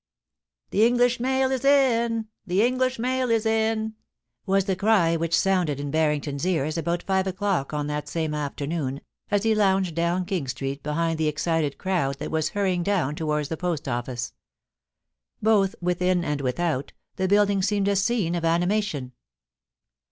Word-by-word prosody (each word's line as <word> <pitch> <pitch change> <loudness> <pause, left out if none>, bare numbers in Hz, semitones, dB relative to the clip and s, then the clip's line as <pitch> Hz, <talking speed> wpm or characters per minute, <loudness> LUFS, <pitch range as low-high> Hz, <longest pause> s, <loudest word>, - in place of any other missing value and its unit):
' - - -53
Tkr - - -1
English 245 0 +2
mail 265 +1 +1
is 260 -1 -1
in! 235 -5 +3 0.2
The 185 +4 +2
English 255 +1 +1
mail 255 +1 0
is 225 -1 +2
in 220 0 +1 0.3
!' - - -55
woa 195 +1 +3
the 190 0 -1
cry 190 -5 +3
which 165 0 +1
sounded 180 -7 +1
in 145 0 -4
Banington's 150 -2 0
ears 155 -4 0
about 170 +1 -1
five 190 0 0
o'clock 190 -6 -1
on 150 -1 -2
that 150 0 -3
same 160 0 -2
afternoon, 145 -1 -3 0.3
as 205 -1 +1
he 225 0 +3
lounged 190 -4 +2
down 170 +2 0
King 175 -7 -2
Street 135 +2 -4
behind 165 +2 -1
the 160 - +1
excited 150 -1 0
crowd 170 -8 -1
that - - -5
was 160 -1 0
hurrying 185 -3 +1
down 175 -6 0
towards 150 -1 -2
the 160 - -3
Post 170 -4 -2
Office. 120 -1 -3 1.1
Both 205 -3 +3
within 180 0 +1
and 150 -2 -1
without, 140 +2 -1 0.2
the 190 - 0
building 205 0 +3
seemed 200 +1 +1
a 200 - +2
scene 200 -3 +1
of 170 -1 -2
animation. 170 -4 0
180 Hz, 165 wpm, -25 LUFS, 150-205 Hz, 1.1 s, in